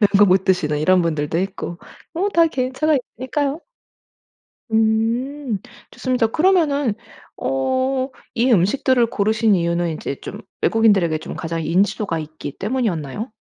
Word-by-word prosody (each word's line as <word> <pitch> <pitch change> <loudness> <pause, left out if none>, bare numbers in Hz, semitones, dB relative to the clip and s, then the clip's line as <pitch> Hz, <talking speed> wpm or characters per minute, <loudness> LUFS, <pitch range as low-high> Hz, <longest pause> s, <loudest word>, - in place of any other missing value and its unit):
매운 205 - +5
거 205 - +8
못 190 0 +3
드시는 155 -6 +1
이런 180 +4 +3
분들도 155 -1 -1
있고 185 -2 -4 0.4
뭐 370 +5 0
다 335 -3 +4
개인차가 270 +2 0
있으니까요. 275 +4 -2 1.1
음. 225 +3 0 0.3
좋습니다. 250 -3 0
그러면은 295 - +2 0.4
어 135 - 0 0.5
이 245 +3 +2
음식들을 235 +5 +3
고르신 220 0 +2
이유는 170 -1 0
이제 140 - -5
좀 - - -8 0.2
외국인들에게 200 -8 +3
좀 155 - -8
가장 165 0 -3
인지도가 185 +1 0
있기 155 -2 -8
때문이었나요? 210 - -2
215 Hz, 310 characters per minute, -20 LUFS, 170-260 Hz, 1.1 s, 거